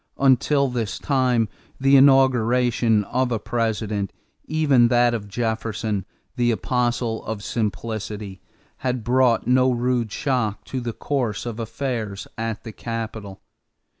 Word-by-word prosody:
Until 140 Hz, +1 st, +3 dB
this 115 Hz, -6 st, -3 dB
time 125 Hz, -5 st, +1 dB, 0.3 s
the 135 Hz, +1 st, +4 dB
inauguration 125 Hz, -4 st, +4 dB
of 125 Hz, +4 st, -1 dB
a 115 Hz, -, +1 dB
President 110 Hz, -3 st, -2 dB, 0.3 s
even 145 Hz, -6 st, +3 dB
that 120 Hz, 0 st, +3 dB
of 105 Hz, -3 st, -4 dB
Jefferson, 110 Hz, -2 st, -2 dB, 0.3 s
the 120 Hz, -1 st, +2 dB
apostle 120 Hz, 0 st, 0 dB
of 105 Hz, -2 st, -4 dB
simplicity 105 Hz, -3 st, -4 dB, 0.4 s
had 125 Hz, -2 st, -2 dB
brought 125 Hz, -1 st, +3 dB
no 130 Hz, +2 st, +4 dB
rude 120 Hz, -2 st, 0 dB
shock 120 Hz, -6 st, -1 dB
to 130 Hz, -, -4 dB
the 120 Hz, -1 st, -4 dB
course 125 Hz, -7 st, -2 dB
of 120 Hz, -1 st, -5 dB
affairs 115 Hz, -3 st, -4 dB
at 115 Hz, -1 st, -4 dB
the 115 Hz, -, -7 dB
capital. 110 Hz, -3 st, -6 dB
120 Hz, 125 wpm, -23 LUFS, 110-125 Hz, 0.4 s, the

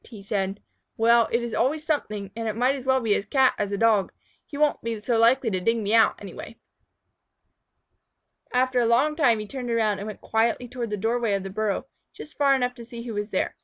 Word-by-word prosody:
said 195 Hz, -1 st, -2 dB
he. -, -, -34 dB, 0.3 s
"Well, 230 Hz, 0 st, +4 dB
it 235 Hz, +1 st, +1 dB
is 235 Hz, -, -5 dB
always 305 Hz, +4 st, 0 dB
something, 210 Hz, -, -2 dB
and 225 Hz, 0 st, -4 dB
it 215 Hz, -, -2 dB
might 250 Hz, +4 st, +2 dB
as 265 Hz, -2 st, -7 dB
well 260 Hz, 0 st, +3 dB
be 220 Hz, -3 st, +1 dB
a -, -, +1 dB
Cat 260 Hz, +5 st, +2 dB
as 205 Hz, -1 st, -1 dB
a 200 Hz, -, -1 dB
Dog. 215 Hz, -3 st, +2 dB, 0.4 s
He 285 Hz, -, -8 dB
won't 300 Hz, 0 st, +2 dB
be 230 Hz, -1 st, -4 dB
so 230 Hz, +2 st, 0 dB
likely 235 Hz, +1 st, +3 dB
to 185 Hz, -, -1 dB
dig 230 Hz, +5 st, +1 dB
me 210 Hz, -1 st, -2 dB
out, 225 Hz, -1 st, +5 dB
anyway." -, -, -9 dB, 1.9 s
After 255 Hz, 0 st, +2 dB
a 235 Hz, -, +2 dB
long 275 Hz, +7 st, +3 dB
time 260 Hz, -8 st, +3 dB
he 215 Hz, -, -5 dB
turned 250 Hz, +2 st, -6 dB
around, 220 Hz, -3 st, +1 dB
and 205 Hz, -, -6 dB
went 215 Hz, -, -7 dB
quietly 230 Hz, +2 st, 0 dB
toward 240 Hz, -1 st, -5 dB
the 210 Hz, -, -3 dB
door 225 Hz, +4 st, 0 dB
way 225 Hz, -4 st, 0 dB
of 195 Hz, -, -3 dB
the 195 Hz, -, -6 dB
burrow, 215 Hz, +3 st, -2 dB, 0.3 s
just 300 Hz, -, -11 dB
far 280 Hz, -2 st, +3 dB
enough 250 Hz, -1 st, 0 dB
to 235 Hz, -, -9 dB
see 235 Hz, 0 st, -9 dB
who 235 Hz, -2 st, -6 dB
was 205 Hz, 0 st, -3 dB
there. -, -, -1 dB
230 Hz, 235 wpm, -25 LUFS, 210-250 Hz, 1.9 s, out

